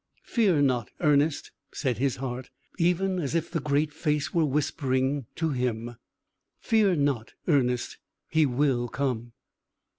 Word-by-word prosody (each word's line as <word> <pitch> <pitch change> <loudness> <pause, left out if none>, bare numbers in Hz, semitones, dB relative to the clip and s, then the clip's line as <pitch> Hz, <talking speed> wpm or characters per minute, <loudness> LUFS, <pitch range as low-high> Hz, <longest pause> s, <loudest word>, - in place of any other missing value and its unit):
"Fear 190 - +2
not, 125 -5 +1
Ernest," 150 -1 +2 0.2
said 130 -6 -2
his 135 -1 +1
heart, 130 -1 -5 0.3
even 180 +2 +2
as 150 -1 -2
if 165 - -1
the 165 - 0
Great 150 +1 0
Face 150 -1 -1
were 170 - +3
whispering 135 -2 0
him 125 -7 -2 0.6
"fear 215 -5 +3
not, 140 -6 0
Ernest; 125 -6 +1 0.3
he 160 -2 +3
will 125 -2 +1
come." 120 -3 -2
140 Hz, 125 wpm, -27 LUFS, 125-160 Hz, 0.6 s, were